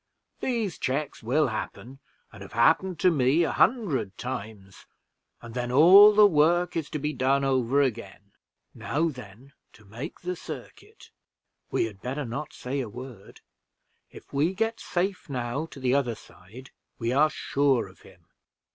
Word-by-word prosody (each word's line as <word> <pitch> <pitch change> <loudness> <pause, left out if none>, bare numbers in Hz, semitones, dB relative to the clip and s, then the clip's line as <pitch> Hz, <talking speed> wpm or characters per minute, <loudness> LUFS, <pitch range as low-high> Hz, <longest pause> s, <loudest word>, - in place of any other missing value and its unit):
These 225 - -2
checks 140 +3 -3
will 135 +5 +1
happen, 120 +4 -7 0.3
and - - -13
have - - -11
happened 160 - +2
to 185 - +5
me 145 +2 +2
a - - 0
hundred 180 - +1
times, 110 -6 -8 0.6
and 115 -1 -10
then 125 0 -3
all 185 +10 +8
the 210 0 +8
work 175 0 +3
is 160 -3 -3
to - - -3
be 150 +1 -3
done 135 +1 +1
over 135 +1 +2
again. 105 -5 -5 0.4
Now 165 +4 -1
then 125 0 -12 0.2
to 105 - -19
make 115 - -8
the 180 +1 -3
circuit - - -11 0.6
we - - 0
had 105 -3 -9
better 135 +3 -4
not 140 +6 -5
say 135 +3 -5
a 125 -5 -4
word. 120 -3 -11 0.7
If - - -15
we 155 +7 +1
get 225 +2 -1
safe 185 -1 -3
now 130 +4 -3
to 145 - -12
the 130 -1 +1
other 130 -5 +1
side, 110 +6 -15 0.3
we 115 0 -2
are 150 +3 +4
sure 140 -4 0
of - - -18
him." - - -19
135 Hz, 160 wpm, -26 LUFS, 120-160 Hz, 0.7 s, all